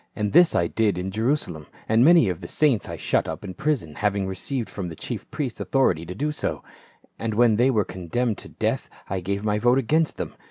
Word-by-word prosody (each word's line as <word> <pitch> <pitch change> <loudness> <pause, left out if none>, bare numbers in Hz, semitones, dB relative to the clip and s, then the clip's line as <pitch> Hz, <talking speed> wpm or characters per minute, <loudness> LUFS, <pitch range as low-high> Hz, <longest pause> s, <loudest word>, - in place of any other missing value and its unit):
And 105 -2 -2
this 175 +1 +6
I 85 - +3
did 105 +1 +1
in 90 +1 -3
Jerusalem, 110 - -1 0.2
and 110 +2 +4
many 165 -5 +6
of 90 -1 -3
the 85 - -7
saints 140 - +1
I - - -5
shut - - 0
up - - -5
in 95 - -6
prison, 130 - -1
having 100 -2 0
received 110 +6 -3
from 95 -4 -5
the 80 - -8
chief - - -6
priests 130 -6 -4
authority 90 - +1
to 90 - -6
do 150 +7 -1
so; 150 - -3 0.6
and 110 -2 -2
when 115 -2 +4
they 125 +3 +4
were 110 -6 +2
condemned 95 +6 -2
to - - -11
death, - - -2 0.2
I 95 - 0
gave 100 +3 -3
my 105 0 +1
vote 120 +3 +4
against 150 +5 +1
them. - - -4
105 Hz, 225 wpm, -24 LUFS, 95-130 Hz, 0.6 s, this